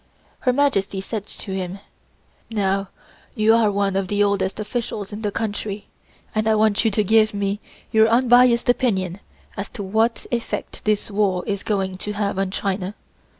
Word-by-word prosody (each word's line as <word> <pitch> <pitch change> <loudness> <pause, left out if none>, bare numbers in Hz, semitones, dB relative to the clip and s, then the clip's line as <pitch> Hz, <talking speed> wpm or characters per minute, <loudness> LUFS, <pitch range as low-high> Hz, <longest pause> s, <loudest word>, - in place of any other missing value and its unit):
Her 255 - +2
Majesty 245 -8 +1
said 205 +1 -5
to 195 - -6
him: 185 0 -3 0.7
"Now, 195 -3 0 0.5
you 215 +1 +4
are 225 -2 +4
one 200 -1 0
of 195 -1 0
the 205 +1 +2
oldest 200 -1 0
officials 215 -2 -4
in 210 - -6
the 210 - 0
country, 210 -1 -4 0.4
and 215 0 0
I 220 - +4
want 215 0 +3
you 225 - +4
to 215 0 +1
give 215 +1 +4
me 200 0 -1 0.3
your 220 0 +5
unbiased 245 +1 +5
opinion 195 -7 +1 0.4
as 200 0 -4
to 205 - -3
what 220 +4 +1
effect 235 -1 -4
this 210 0 0
war 195 -3 +1
is 200 -1 -2
going 190 -3 -1
to 210 +2 -4
have 200 -2 -1
on 195 -1 0
China. 195 0 -2
205 Hz, 170 wpm, -22 LUFS, 195-220 Hz, 0.7 s, your